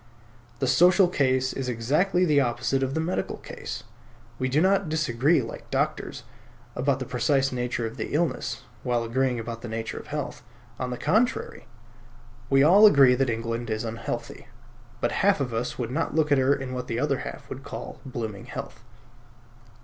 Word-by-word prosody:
The 135 - -1
social 180 +8 +5
case 130 -5 +1
is 130 -2 -3
exactly 150 - +2
the 150 -4 +4
opposite 125 +2 0
of 135 0 -1
the - - +1
medical 170 +3 -2
case. - - -7 0.6
We 130 - 0
do 140 +4 +2
not 190 0 +3
disagree, 150 -1 +2
like 115 - -9
doctors, - - -2 0.5
about 135 +1 +1
the 130 - -5
precise 135 +2 +1
nature 125 -2 -2
of 115 +3 -6
the 110 - -3
illness, 155 -3 -1 0.2
while 120 -1 0
agreeing 125 +1 0
about 115 0 -6
the - - -6
nature 115 0 -4
of - - -12
health. 150 -1 -4 0.4
On 130 - -2
the 125 - -4
contrary, 230 - 0 0.8
we 135 0 +5
all 195 +8 +8
agree 135 -9 +6
that 130 0 +1
England 115 +1 -3
is 110 0 -2
unhealthy, 115 +1 -5 0.5
but 120 - +1
half 200 -2 +4
of 125 -4 -2
us 115 +2 -2
would 120 -1 -3
not 160 +4 -1
look 155 -2 +2
at 140 - +5
her 135 +2 +4
in 135 -2 -5
what 125 0 -4
the 115 - -2
other 140 +1 0
half - - -7
would - - -7
call - - -8
blooming 110 -6 -5
health. - - -8
130 Hz, 180 wpm, -26 LUFS, 120-150 Hz, 0.8 s, all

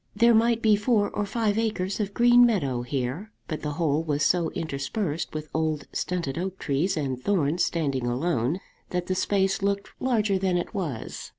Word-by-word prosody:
There 235 +2 +5
might 230 +1 +3
be 215 -2 +6
four 210 0 +1
or 205 -1 -2
five 220 -1 0
acres 205 -4 -1
of 200 -1 -3
green 240 0 +6
meadow 140 - +2
here; 135 - -3 0.2
but 155 - -4
the 150 -1 -3
whole 155 -1 +1
was 150 -2 0
so 175 -2 +2
interspersed 155 +3 -3
with 155 0 -4
old 155 -2 -1
stunted 170 -5 -2
oak 190 +1 -3
trees 160 +6 0
and 135 -4 -2
thorns 175 -4 +1
standing 140 -7 -1
alone 135 +4 0 0.3
that 180 -1 -2
the 185 - -1
space 195 +1 +1
looked 200 0 -1
larger 215 -6 +1
than 185 -2 +1
it 175 - -4
was. 160 - -4
180 Hz, 180 wpm, -26 LUFS, 150-205 Hz, 0.3 s, be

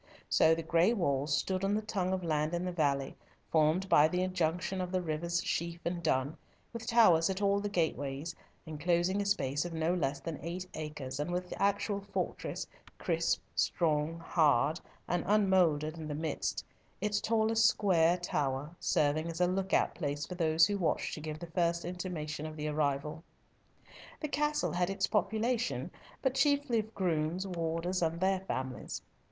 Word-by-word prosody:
So 160 - +5
the 165 - -4
gray 170 +7 +3
walls 145 - 0
stood 190 0 -1
on 200 +1 +2
the 215 - 0
tongue 190 -4 -1
of 190 -1 -1
land 155 0 0
in 175 +1 -2
the 180 - -1
valley, 140 -5 0 0.4
formed 160 +4 +3
by 150 -4 +6
the 180 +3 0
junction 180 +1 -1
of 180 0 -4
the 185 - +1
rivers 170 +1 -1
Sheaf 170 0 -2
and 175 0 -2
Dun, 140 -2 0 0.4
with 230 -1 -6
towers 205 -8 +5
at 190 0 -2
all 200 0 +2
the 205 0 -2
gateways, 160 -4 -2 0.3
enclosing 175 +5 0
a 200 - -2
space 145 -8 0
of 175 -1 -5
no 160 +2 +1
less 140 -5 -1
than 155 +2 -5
eight 175 +3 -4
acres, 150 -4 -5
and 150 +3 -2
with 180 +1 -3
the - - -6
actual 200 0 +1
fortress, 200 0 -3 0.3
crisp, - - 0
strong, 155 -1 +1
hard, 155 -2 +2 0.3
and 175 -1 0
unmouldered 180 -6 +3
in 155 - -5
the 150 - -3
midst, 155 0 -2 0.3
its 205 +1 0
tallest 225 0 +3
square 175 -6 +3
tower 145 -4 -2
serving 155 -1 +1
as 165 0 -5
a 180 - +4
look 190 +1 -1
out - - +3
place 145 -2 -3
for - - -7
those 160 -2 +4
who 205 +1 -1
watched 170 - 0
to 155 - -5
give 155 0 -5
the 170 - -7
first 170 0 0
intimation 165 -4 -4
of 155 - -8
the 155 0 -3
arrival. 150 +1 -1 1.0
The 305 - -3
castle 295 +1 0
had 175 +1 0
its 195 - 0
population, 220 +4 0 0.3
but 265 -2 +2
chiefly 285 -3 +2
of 220 +1 -6
grooms, 170 0 0
warders, 175 0 -2
and 165 0 0
their 190 +1 +2
families. 130 -8 -5
170 Hz, 175 wpm, -32 LUFS, 155-190 Hz, 1.0 s, by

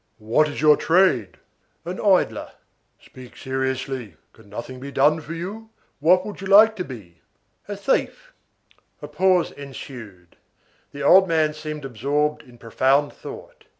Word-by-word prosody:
"What 115 +8 +1
is 145 - -6
your 150 -1 +6
trade?" 160 - +2 0.5
"An - - -5
idler." - - +1 0.5
"Speak 125 -1 -15
seriously. 130 -5 -4 0.2
Can 100 - -20
anything 125 +4 -7
be 140 +2 -8
done 150 +4 +2
for 160 +2 -8
you? 205 +6 -7 0.3
What 180 +5 +3
would 210 -2 -8
you 195 - -5
like 215 +3 +7
to 180 - -2
be?" 95 - -12 0.5
"A 205 -1 -5
thief." - - -2 0.7
A - - -5
pause 180 +4 +2
ensued. 120 -10 -11 0.5
The 140 - -7
old 190 +1 +6
man 160 -2 +1
seemed 150 -1 -7
absorbed 145 +5 -1
in 125 -1 -18
profound 135 +5 +1
thought. - - -11
145 Hz, 145 wpm, -22 LUFS, 130-180 Hz, 0.7 s, like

